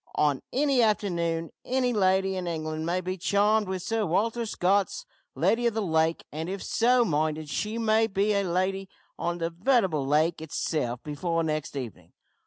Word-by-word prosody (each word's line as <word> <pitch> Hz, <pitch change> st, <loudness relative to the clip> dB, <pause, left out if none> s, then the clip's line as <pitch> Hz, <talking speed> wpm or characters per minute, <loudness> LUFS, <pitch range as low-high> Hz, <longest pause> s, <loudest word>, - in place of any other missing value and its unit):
On 145 Hz, -3 st, +2 dB
any 275 Hz, -1 st, +2 dB
afternoon 170 Hz, -7 st, 0 dB
any 250 Hz, -1 st, 0 dB
lady 190 Hz, -2 st, +2 dB
in 185 Hz, -1 st, -3 dB
England 155 Hz, -1 st, -3 dB
may 180 Hz, +2 st, 0 dB
be 185 Hz, +1 st, -4 dB
charmed 205 Hz, +3 st, +2 dB
with 185 Hz, -1 st, -3 dB
Sir 225 Hz, -1 st, 0 dB
Walter 225 Hz, +6 st, 0 dB
Scott's 200 Hz, -, 0 dB, 0.3 s
`Lady 235 Hz, +1 st, +2 dB
of 230 Hz, -, -1 dB
the 220 Hz, -, 0 dB
Lake,' 160 Hz, -1 st, +1 dB
and, 160 Hz, +3 st, -4 dB
if 195 Hz, +1 st, -4 dB
so 245 Hz, +1 st, +3 dB
minded, 155 Hz, -2 st, -1 dB
she 215 Hz, +8 st, -2 dB
may 225 Hz, -1 st, +3 dB
be 205 Hz, 0 st, +1 dB
a 200 Hz, -, +2 dB
lady 190 Hz, +1 st, -1 dB, 0.3 s
on 170 Hz, 0 st, -1 dB
the 165 Hz, 0 st, -2 dB
veritable 180 Hz, -, +1 dB
lake 155 Hz, +3 st, +2 dB
itself 145 Hz, -5 st, -2 dB
before 165 Hz, +3 st, -1 dB
next 155 Hz, -2 st, -3 dB
evening! 110 Hz, -, -7 dB
185 Hz, 170 wpm, -27 LUFS, 160-215 Hz, 0.3 s, so